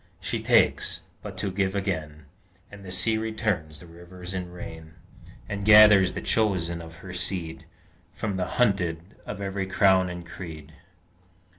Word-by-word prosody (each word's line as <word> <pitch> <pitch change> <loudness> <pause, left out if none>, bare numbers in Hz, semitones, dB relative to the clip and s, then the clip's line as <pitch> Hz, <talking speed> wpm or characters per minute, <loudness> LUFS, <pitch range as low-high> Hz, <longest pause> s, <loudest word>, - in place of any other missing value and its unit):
She - - -2
takes, - - +2 0.2
but - - -8
to 100 - -2
give 95 +1 -1
again, 80 -7 -3 0.5
As 100 0 -11
the 95 -2 -9
sea 110 +4 +1
returns 110 -9 -2
the - - -12
rivers 90 +2 -10
in 90 -2 -4
rain; 80 -2 -10 0.5
And 100 -1 -4
gathers 105 -3 +8
the - - -4
chosen 90 -6 0
of 80 0 -11
her 90 - -7
seed 85 -4 -3 0.5
From 105 -3 -3
the 90 -1 -1
hunted 95 -9 +2 0.3
of 105 - -5
every 95 -1 -3
crown 95 -1 +4
and 90 -1 -7
creed. 80 -3 -9
95 Hz, 150 wpm, -26 LUFS, 85-100 Hz, 0.5 s, gathers